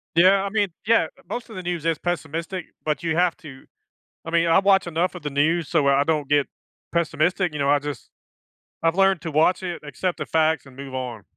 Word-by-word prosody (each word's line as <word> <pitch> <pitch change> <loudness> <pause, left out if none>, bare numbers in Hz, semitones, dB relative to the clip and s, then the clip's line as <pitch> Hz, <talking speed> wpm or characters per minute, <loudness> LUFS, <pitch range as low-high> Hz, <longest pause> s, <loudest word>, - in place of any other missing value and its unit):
Yeah, 190 +3 +5
I 200 - -2
mean 205 -2 +1 0.2
Yeah, 225 -7 +4 0.2
most 235 +2 -5
of 220 - -10
the 185 - -6
news 175 -2 -3
is 165 -2 +1
pessimistic, 170 +1 -3 0.2
but 155 +2 -1
you 160 -1 0
have 175 -1 +2
to 145 -7 -12 0.6
I 165 - -5
mean, 170 0 +3
I 165 +3 +5
watch 195 -1 +4
enough 170 +1 -1
of - - -9
the 150 - -2
news 155 +4 +1
so 150 -5 +2
I 140 +1 +4
don't 150 -2 0
get 145 -1 +3 0.4
pessimistic, 170 +1 0
you 150 - -5
know, 140 0 +1
I 145 0 +4
just 145 0 -7 0.7
I've 165 +1 +2
learned 195 -3 +3
to 165 -2 -5
watch 160 +5 +3
it, 175 -2 -4
accept 170 +5 -3
the - - -3
facts, 160 -2 +1
and 130 -2 -15
move 135 -1 -9
on. 120 -5 -5
165 Hz, 220 wpm, -23 LUFS, 145-180 Hz, 0.7 s, Yeah